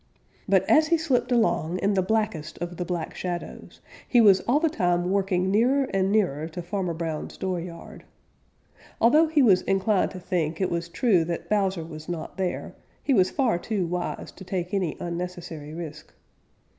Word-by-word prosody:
But - - +3
as 310 0 +5
he 335 +1 +3
slipped 260 -6 0
along 205 -8 +1
in 200 +2 +1
the 190 - +2
blackest 200 -6 -1
of 175 0 -5
the 180 - -3
Black 175 -2 -3
Shadows, 175 -1 -6 0.3
he 245 - +4
was 200 -4 +6
all 260 +5 +4
the 325 - +2
time 175 - 0
working 190 -2 +1
nearer 250 +7 +3
and 195 0 +1
nearer 170 -8 +1
to 175 +2 -7
Farmer 180 -2 -2
Brown's 160 -2 -4
dooryard. 175 -2 -5 1.0
Although 300 +8 +5
he 310 -3 +3
was 195 -7 +5
inclined 195 +1 +1
to 185 - -8
think 170 -3 -2
it 190 - 0
was 170 0 -2
true 190 -3 +2
that 170 0 -4
Bowser 190 -4 +1
was 155 0 -9
not 170 0 -5
there, 185 -2 -3 0.3
he 280 - +2
was 185 -6 +4
far 245 -10 +1
too 200 -1 -2
wise 175 +1 -4
to - - -12
take 180 -1 -4
any 185 -6 -1
unnecessary 170 -3 -5
risk. 155 -2 -8
185 Hz, 175 wpm, -25 LUFS, 170-215 Hz, 1.0 s, was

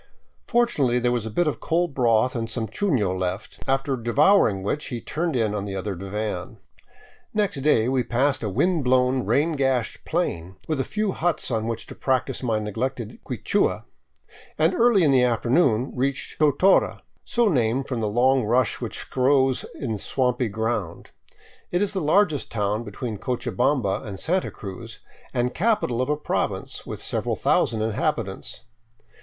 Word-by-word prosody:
Fortunately 190 - +2
there 125 0 +1
was 120 -3 -1
a - - -3
bit 165 +10 +1
of 150 - -1
cold 170 -1 0
broth 120 -1 +2
and 115 -1 -2
some 115 -1 -3
chuno 115 - 0
left, 95 +4 -4
after 135 0 +1
devouring 120 - +3
which 150 +9 -2
he 120 - -4
turned 165 +4 -2
in 110 -4 +1
on 105 -1 -2
the 100 -1 -5
other 95 +1 -3
divan. 100 +3 -4 0.8
Next 205 -7 +1
day 125 -6 +3
we 130 0 +2
passed 130 +4 0
a 110 - -2
wind 165 - +1
blown, 125 0 +2
rain 155 +4 +2
gashed 135 -5 0
plain, 95 - -2
with 155 -3 -1
a - - +2
few 215 +3 -1
huts 170 -6 -1
on 110 -1 -1
which 115 -1 -3
to - - -10
practice 130 0 -1
my 115 -4 0
neglected 115 +2 -4
Quichua - - 0 0.7
and, 160 +4 +3
early 230 -5 +4
in 145 - +4
the 130 -2 +5
afternoon, 125 +1 +2
reached 135 +2 -2
Totora, 155 +6 +3 0.2
so 240 -1 +1
named 130 - +1
from 125 -4 -2
a 110 - 0
long 125 +4 +3
rush 120 +2 +1
which - - -5
grows 130 0 +2
in 110 -6 -3
swampy 125 -1 0
ground. 110 -4 -3 0.6
It 175 - 0
is 205 +1 0
the 190 - -1
largest 155 -1 +2
town 105 +1 -1
between 110 0 -5
Cochabamba 125 -2 0
and 100 -3 -7
Santa 185 +3 0
Cruz 110 +3 -9 0.3
and 125 -1 0
capital 205 - +1
of 130 - -1
a 150 - +1
province, 150 - -3
with - - -5
several - - -1
thousand 110 -1 +1
inhabitants. 110 -1 -2
125 Hz, 165 wpm, -24 LUFS, 110-145 Hz, 0.8 s, the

